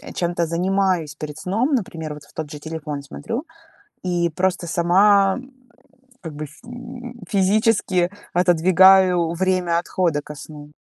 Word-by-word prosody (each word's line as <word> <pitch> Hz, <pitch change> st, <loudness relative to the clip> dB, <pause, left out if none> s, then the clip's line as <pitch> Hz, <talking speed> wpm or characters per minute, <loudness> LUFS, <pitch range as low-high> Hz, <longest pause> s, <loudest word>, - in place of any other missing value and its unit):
чем-то 175 Hz, -1 st, 0 dB
занимаюсь 180 Hz, -2 st, 0 dB
перед 150 Hz, -1 st, -7 dB
сном, 225 Hz, -, -1 dB
например, 165 Hz, -9 st, -4 dB
вот 150 Hz, 0 st, -11 dB
в -, -, -23 dB
тот 155 Hz, -2 st, -6 dB
же 150 Hz, -, -7 dB
телефон 150 Hz, -2 st, -5 dB
смотрю, 225 Hz, -, -5 dB, 0.6 s
и 175 Hz, -1 st, +1 dB
просто 180 Hz, +1 st, -1 dB
сама, 190 Hz, +4 st, +4 dB
м, 260 Hz, +1 st, -12 dB, 0.7 s
как 160 Hz, -4 st, -7 dB
бы, 150 Hz, +1 st, -6 dB
ф 150 Hz, +2 st, -16 dB
м, 245 Hz, 0 st, -9 dB
физически 200 Hz, -2 st, +2 dB, 0.2 s
отодвигаю 180 Hz, 0 st, +5 dB
время 180 Hz, -1 st, +1 dB
отхода 170 Hz, -3 st, -1 dB
ко 150 Hz, +1 st, -10 dB
сну. 150 Hz, 0 st, -11 dB
175 Hz, 140 wpm, -21 LUFS, 160-195 Hz, 0.7 s, отодвигаю